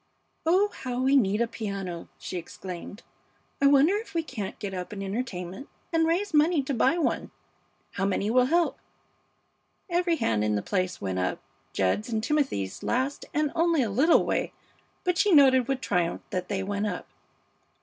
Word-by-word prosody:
"Oh, 380 Hz, +5 st, +4 dB
how 250 Hz, -1 st, -3 dB
we 265 Hz, +2 st, +3 dB
need 210 Hz, -4 st, +3 dB
a 235 Hz, -, +2 dB
piano!" 195 Hz, -6 st, -5 dB
she 135 Hz, +6 st, -7 dB
exclaimed. 180 Hz, +4 st, -8 dB, 0.6 s
"I 280 Hz, -, +6 dB
wonder 285 Hz, +7 st, +5 dB
if 440 Hz, -4 st, -8 dB
we 330 Hz, -, +1 dB
can't 215 Hz, -10 st, -6 dB
get 200 Hz, -2 st, -5 dB
up 180 Hz, -1 st, -5 dB
an 200 Hz, -1 st, -5 dB
entertainment 195 Hz, +1 st, -5 dB, 0.2 s
and 325 Hz, 0 st, +3 dB
raise 355 Hz, +3 st, 0 dB
money 305 Hz, 0 st, +4 dB
to 275 Hz, -, -2 dB
buy 270 Hz, +7 st, +3 dB
one. 335 Hz, -, -1 dB, 0.6 s
How 195 Hz, -, -2 dB
many 200 Hz, +2 st, 0 dB
will 250 Hz, +1 st, +5 dB
help?" 340 Hz, +3 st, +1 dB, 1.1 s
Every 345 Hz, -1 st, +2 dB
hand 115 Hz, -, 0 dB
in 105 Hz, 0 st, +1 dB
the 105 Hz, -, -1 dB
place 185 Hz, -2 st, -1 dB
went 95 Hz, -2 st, -2 dB
up, 90 Hz, -, -1 dB, 0.3 s
Jed's 100 Hz, -, 0 dB
and 220 Hz, -2 st, -1 dB
Timothy's 265 Hz, -, -1 dB
last 260 Hz, +3 st, -1 dB
and 300 Hz, -1 st, 0 dB
only 335 Hz, -4 st, +2 dB
a 220 Hz, -, -2 dB
little 280 Hz, -, +4 dB
way, -, -, -1 dB, 0.5 s
but 360 Hz, -2 st, 0 dB
she 415 Hz, -, +4 dB
noted 260 Hz, -5 st, +6 dB
with 270 Hz, -1 st, -1 dB
triumph 175 Hz, -6 st, 0 dB
that 180 Hz, -1 st, -2 dB
they 195 Hz, -2 st, -2 dB
went 205 Hz, +2 st, -1 dB
up. -, -, -4 dB
240 Hz, 175 wpm, -27 LUFS, 190-300 Hz, 1.1 s, I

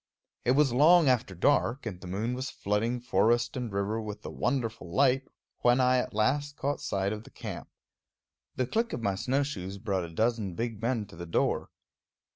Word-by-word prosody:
It 125 Hz, -, +4 dB
was 140 Hz, -2 st, +3 dB
long 160 Hz, +5 st, +6 dB
after 120 Hz, -7 st, +1 dB
dark, 130 Hz, -, +2 dB
and 95 Hz, -5 st, -5 dB
the 90 Hz, -, -8 dB
moon 105 Hz, +7 st, -2 dB
was 130 Hz, +2 st, -3 dB
flooding 110 Hz, +5 st, -1 dB
forest 120 Hz, +1 st, +2 dB
and 125 Hz, -4 st, -3 dB
river 100 Hz, +3 st, -1 dB
with 105 Hz, -1 st, -7 dB
a -, -, -5 dB
wonderful 115 Hz, -8 st, -2 dB
light, 135 Hz, +6 st, +3 dB, 0.3 s
when 120 Hz, +1 st, +4 dB
I 125 Hz, 0 st, +4 dB
at 120 Hz, -, -4 dB
last 145 Hz, +7 st, +1 dB
caught 145 Hz, +1 st, -2 dB
sight 100 Hz, +1 st, -1 dB
of 105 Hz, 0 st, -6 dB
the -, -, -14 dB
camp. -, -, -7 dB, 0.9 s
The 130 Hz, -, 0 dB
click 230 Hz, -, -1 dB
of 120 Hz, -, -4 dB
my 100 Hz, -2 st, +1 dB
snowshoes 115 Hz, -3 st, -2 dB
brought 100 Hz, -3 st, -1 dB
a -, -, -8 dB
dozen 110 Hz, 0 st, 0 dB
big 115 Hz, -1 st, -3 dB
men 115 Hz, -2 st, 0 dB
to 100 Hz, -, -14 dB
the 85 Hz, +1 st, -7 dB
door. 80 Hz, -, 0 dB
115 Hz, 190 wpm, -29 LUFS, 100-130 Hz, 0.9 s, long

